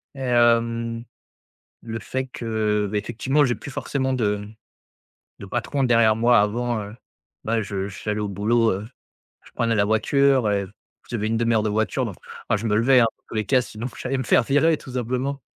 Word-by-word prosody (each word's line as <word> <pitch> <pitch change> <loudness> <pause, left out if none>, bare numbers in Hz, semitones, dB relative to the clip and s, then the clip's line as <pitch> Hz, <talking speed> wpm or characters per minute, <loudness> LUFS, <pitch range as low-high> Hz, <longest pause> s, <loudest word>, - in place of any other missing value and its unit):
et - - -10
hem, 115 -1 +2 0.8
le 115 -1 -5
fait 130 +3 -4
que, 110 -4 -1
ben, 105 - +1
effectivement 130 +7 +1
j'ai 120 -2 +1
plus - - -9
forcément 130 -1 -2
de 105 -4 -1 0.9
de 100 - -9
patron 125 +6 -1
derrière 115 -3 +4
moi 120 -1 +5
avant, 115 +1 -1
heu, 105 +2 -9 0.5
ben 115 0 0
je 100 -1 -4
j'allais 105 +2 -4
au 105 - -2
boulot, 110 +4 +2
heu, 100 +3 -4 0.6
je - - -18
prenais 115 -1 0
la 100 -1 +3
voiture 125 +2 +2
et 100 -1 0 0.4
j'avais 110 -3 -2
une 115 0 0
1/2 115 0 +1
heure 110 - +2
de 110 - 0
voiture, 110 +4 0
donc, 100 -5 -6 0.3
enfin - - +3
je 115 - -6
me 105 - +1
levais, 125 +3 +5
hein, 115 - +5
dans - - -45
tous - - -8
les 110 -1 0
cas, 130 +1 +3
sinon 115 0 -6
j'allais 135 +1 -2
me 130 - -2
faire 115 - +4
virer 150 +5 +3
tout 130 - -11
simplement. 130 +3 -2
115 Hz, 195 wpm, -23 LUFS, 105-125 Hz, 0.9 s, moi